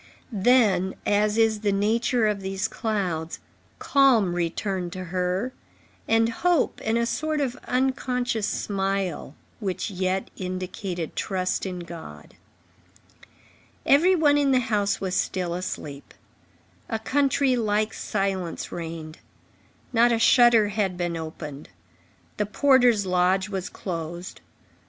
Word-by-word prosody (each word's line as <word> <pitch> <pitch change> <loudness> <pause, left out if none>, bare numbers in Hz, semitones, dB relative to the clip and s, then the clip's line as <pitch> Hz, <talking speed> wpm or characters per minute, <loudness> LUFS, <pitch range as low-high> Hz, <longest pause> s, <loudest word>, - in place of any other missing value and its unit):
Then, 205 -4 +3
as 210 +1 +2
is 225 -1 +3
the 205 -1 0
nature 225 +4 +1
of 210 -2 0
these 190 0 -2
clouds, 180 -7 -2 0.4
calm 250 -10 +3
returned 175 +1 -2
to 185 -1 -5
her, 185 +7 -1 0.5
and 225 0 +3
hope 335 +7 +1
and 220 +1 +1
a 235 - +1
sort 310 +5 -1
of 260 -4 -1
unconscious 250 -3 0
smile, 195 -7 -2 0.2
which 200 -1 -3
yet 185 0 -2
indicated 185 -2 -5
trust 185 -1 -1
in 180 -1 -5
God. 160 - -10 1.5
Every 345 +7 +5
one 290 -3 +4
in 285 -1 +2
the 260 -1 +4
house 210 -4 0
was 190 -2 -3
still 180 -2 -1
asleep. 150 -5 -6 0.7
A 225 - -1
country 270 +2 +1
like 215 -2 0
silence 195 -4 -3
reigned. 165 -1 -7 0.7
Not 240 +1 +5
a 230 - +2
shutter 230 -2 +5
had 195 -3 -1
been 175 -1 -2
opened. 155 -3 -7 0.7
The 210 - 0
porter's 245 -3 +4
lodge 185 +2 +2
was 190 -2 -4
closed. 170 0 -6
200 Hz, 120 wpm, -25 LUFS, 180-235 Hz, 1.5 s, Every